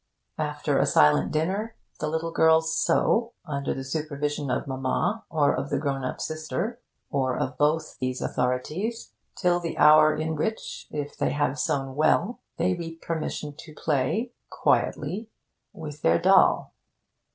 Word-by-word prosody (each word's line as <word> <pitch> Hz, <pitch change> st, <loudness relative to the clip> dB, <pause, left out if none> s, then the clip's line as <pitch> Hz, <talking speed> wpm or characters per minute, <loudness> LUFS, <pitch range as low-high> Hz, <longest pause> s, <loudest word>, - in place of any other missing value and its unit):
After -, -, 0 dB
a -, -, +3 dB
silent 75 Hz, -1 st, +4 dB
dinner, 190 Hz, +9 st, -1 dB, 0.2 s
the 155 Hz, -, -1 dB
little 160 Hz, +2 st, -2 dB
girls 160 Hz, 0 st, +4 dB
sew, 230 Hz, +7 st, +2 dB
under 140 Hz, -2 st, -2 dB
the 135 Hz, -, -3 dB
supervision 145 Hz, 0 st, -3 dB
of 125 Hz, -, -1 dB
Mamma, 135 Hz, -, -1 dB
or 150 Hz, -4 st, +2 dB
of 135 Hz, +2 st, -3 dB
the 140 Hz, -, 0 dB
grown 135 Hz, -2 st, -2 dB
up 130 Hz, -, -3 dB
sister, 170 Hz, +9 st, -3 dB, 0.3 s
or 130 Hz, -2 st, 0 dB
of 130 Hz, 0 st, -2 dB
both 155 Hz, +1 st, +1 dB
these 130 Hz, 0 st, -2 dB
authorities, 150 Hz, -, -2 dB, 0.2 s
till 175 Hz, -1 st, +2 dB
the 170 Hz, -2 st, -4 dB
hour 155 Hz, 0 st, +7 dB
in 155 Hz, +1 st, -2 dB
which 220 Hz, +9 st, -3 dB
(if 145 Hz, -1 st, -5 dB
they -, -, 0 dB
have 145 Hz, -1 st, 0 dB
sewn 135 Hz, -1 st, -1 dB
well) 170 Hz, -, +2 dB, 0.2 s
they 185 Hz, +2 st, +2 dB
reap 165 Hz, -2 st, -7 dB
permission 155 Hz, -2 st, -3 dB
to 155 Hz, -2 st, -12 dB
play 155 Hz, -, 0 dB, 0.2 s
(quietly) 220 Hz, +4 st, 0 dB, 0.4 s
with 150 Hz, -2 st, -8 dB
their 80 Hz, +1 st, +4 dB
doll. -, -, +4 dB
155 Hz, 150 wpm, -26 LUFS, 140-165 Hz, 0.4 s, hour